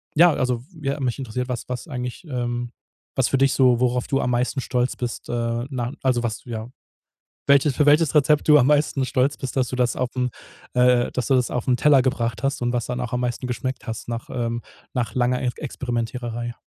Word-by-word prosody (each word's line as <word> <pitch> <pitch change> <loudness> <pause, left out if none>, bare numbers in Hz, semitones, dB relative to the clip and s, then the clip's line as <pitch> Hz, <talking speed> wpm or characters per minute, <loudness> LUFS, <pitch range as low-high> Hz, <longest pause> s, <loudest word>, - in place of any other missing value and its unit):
ja, 170 +3 +7
also 125 -2 -1 0.2
ja, 140 0 -1
mich 125 0 -1
interessiert, 125 0 -4
was 125 -2 -4
was 125 +6 -5
eigentlich, 125 +3 -5
ähm, 120 -1 -2 0.5
was 130 - +3
für 135 - +1
dich 135 0 +4
so 125 -2 +4
worauf 125 0 +1
du 135 - +1
am - - 0
meisten 125 +2 0
stolz 125 0 0
bist, 120 -1 -5
äh, 120 0 -1
na 125 -3 -3
also 125 -2 +2
was 110 -3 -3
ja 115 -1 -5 0.8
welches 140 0 +4
für 150 - +4
welches 150 +1 +4
Rezept 150 0 +4
du 150 0 +8
am 130 - +4
meisten 145 -2 +2
stolz 130 +2 +1
bist, 135 -1 -6
dass 130 -1 +2
du 130 - -4
das 125 -1 +1
aufm 125 0 -1 0.4
äh, 125 -1 +4
dass 125 -3 -2
du 135 - +4
das 125 -1 +2
auf 125 - -2
'n 125 - +4
Teller 145 +1 +5
gebracht 115 -3 -1
hast 135 -2 -1
und 120 0 +1
was 120 -2 -1
dann 125 0 -3
auch 125 -1 -4
am 125 - 0
meisten 125 +1 -2
geschmeckt 130 +2 -4
hast 115 +1 -5
nach 115 0 -4
ähm 120 -1 -2 0.3
nach 125 -3 -2
langer 125 0 +1
Er 125 - 0
Experimentieren. 120 -3 -4
125 Hz, 215 wpm, -23 LUFS, 120-135 Hz, 0.8 s, du